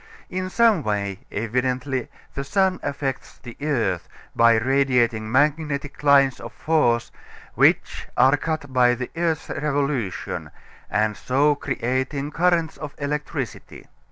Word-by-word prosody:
In 185 0 -3
some 225 -3 +4
way, 100 -4 -2
evidently, 125 +3 -2 0.2
the 135 - -3
sun 190 +4 +1
affects 140 -2 -4
the 120 -3 -11
earth 115 - -1 0.3
by 115 0 +5
radiating 120 -3 +1
magnetic 145 +1 0
lines 140 -2 +4
of - - -9
force 130 -7 +1 0.4
which - - +2
are 135 +2 +6
cut 145 -2 -4
by 125 -1 +4
the 125 +1 -6
earth's 165 -2 -1
revolution, 140 -8 -2 0.4
and 105 +1 +1
so 145 +4 +2
creating 135 +1 -2
currents 170 0 +1
of 150 -2 -8
electricity. 145 - -5
135 Hz, 120 wpm, -23 LUFS, 120-150 Hz, 0.4 s, are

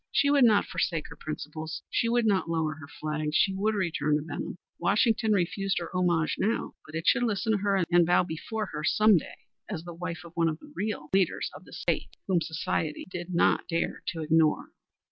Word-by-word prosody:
She 285 - +3
would 280 -3 +6
not 215 -3 +4
forsake 165 -4 -2
her - - -10
principles. 155 +1 -6
She 230 - +1
would 240 0 +2
not 195 -5 +2
lower 160 -2 0
her 145 -1 -11
flag. 155 0 -3
She 195 - +4
would 210 +3 0
return 165 -6 +1
to 150 - -1
Benham. 160 +2 -5 0.2
Washington 220 +4 +2
refused 195 0 +1
her 170 +1 -4
homage 175 -3 +1
now, 225 +4 0
but 155 - -9
it 165 +1 -3
should 260 - +4
listen 220 -3 0
to 215 - +3
her 195 -2 +2
and 175 0 +6
bow 175 +2 +4
before 180 +6 -4
her 150 0 -4
some 215 +5 +5
day - - -6 0.3
as 175 -6 -4
the 175 0 -8
wife 170 -1 -5
of 170 - -12
one 165 -1 +3
of 155 - -3
the 295 - -16
real 195 -8 -3
leaders 190 -2 +1
of - - -12
the - - -14
State, - - -2
whom 180 -3 +2
Society 160 -1 -2
did 175 0 -5
not - - +3
dare 165 -1 -1
to 165 - -3
ignore. 155 0 +2
175 Hz, 210 wpm, -28 LUFS, 160-205 Hz, 0.3 s, would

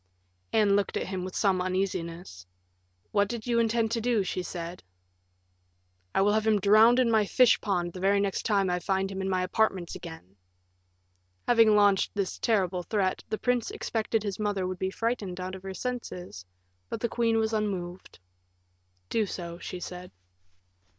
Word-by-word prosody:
Anne 210 -3 +4
looked 200 0 0
at - - -2
him 185 -1 -4
with 185 0 -6
some 190 -3 +2
uneasiness. 175 - -3 0.6
"What 205 -1 +2
do 235 +3 -3
you 235 -1 +1
intend 225 -1 +1
to 230 0 0
do?" 230 -3 +1
she 185 0 -3
said. 175 0 -6 1.3
"I - - +4
will 205 +1 +3
have 220 0 +1
him 215 -2 +4
drowned 215 +5 +6
in 250 -2 +3
my 220 -1 +4
fish 250 +2 +4
pond 175 -4 -1
the 185 - -7
very 200 +2 +3
next 200 -1 -1
time 200 -3 +2
I 180 - 0
find 195 +1 -1
him 190 0 -4
in 190 - -2
my 185 -1 +1
apartments 185 -2 0
again." 160 - -10 1.1
Having 225 -3 +5
launched 205 -1 +3
this 200 -2 -2
terrible 190 -6 +1
threat, 190 0 -1
the 215 - -1
prince 245 -1 0
expected 220 -1 -2
his 200 -2 -4
mother 205 -3 -1
would 185 0 -4
be 190 - -1
frightened 205 -4 -3
out 185 +1 -5
of 190 - -7
her 190 0 -7
senses; 180 - -5 0.4
but - - -4
the 235 - 0
queen 230 -1 +1
was 220 0 0
unmoved. 190 -4 -3 0.9
"Do 215 - 0
so," 170 -2 -6
she 180 - -6
said. 180 +1 -8
195 Hz, 175 wpm, -28 LUFS, 185-220 Hz, 1.3 s, drowned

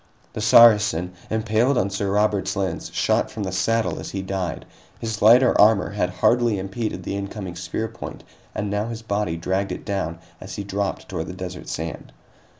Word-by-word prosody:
The - - -4
Saracen, 105 -6 +6 0.2
impaled 110 +4 +1
on 100 -4 +1
Sir 100 +1 -2
Robert's 100 -1 +1
lance, 95 -1 -3
shot - - +1
from 105 - -5
the 95 - -3
saddle 115 +5 0
as - - -6
he 95 -1 -4
died. 95 -4 -3 0.3
His 110 -1 -4
lighter 120 +3 +7
armor 105 -3 +4
had 100 -3 0
hardly 120 +4 +2
impeded 100 +4 -4
the - - -3
incoming 100 -2 -5
spear 90 +6 -3
point, 115 - -9 0.3
and 105 -1 -2
now 105 +2 -1
his 115 -1 -6
body 100 -6 -1
dragged 95 +3 -1
it - - -6
down 85 -5 -2 0.2
as - - -8
he 100 - -4
dropped 100 0 -3
toward 80 - -4
the 90 - -6
desert 90 -1 -7
sand. - - -5
100 Hz, 180 wpm, -23 LUFS, 95-110 Hz, 0.3 s, lighter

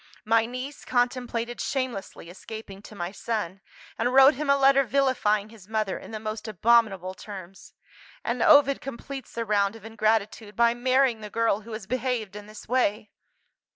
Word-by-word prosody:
My 225 +1 +3
niece 255 +4 -7
contemplated 245 -1 -1
shamelessly 255 - -4
escaping 200 0 -9
to 215 - -13
my 175 -1 -4
son, 200 -3 -4 0.4
and 245 - +1
wrote 270 +2 +7
him 290 +2 -4
a 280 - +5
letter 275 0 +5
vilifying 240 -5 +1
his 215 -4 -15
mother 215 -3 -1
in - - -12
the 220 -1 -5
most 215 +1 -5
abominable 210 -3 +2
terms. 190 -1 -11 0.5
And - - -2
Ovid 285 -5 +6
completes 270 +1 -8
the 230 0 -3
round 200 -1 +1
of 225 -2 -13
ingratitude 215 -1 -1
by 235 0 +4
marrying 255 -1 +2
the 210 - -7
girl 225 -1 +1
who 225 +1 -10
has 215 -2 -6
behaved 245 -3 -2
in 210 0 -9
this 215 0 -12
way. 215 -3 0
225 Hz, 165 wpm, -26 LUFS, 210-255 Hz, 0.5 s, wrote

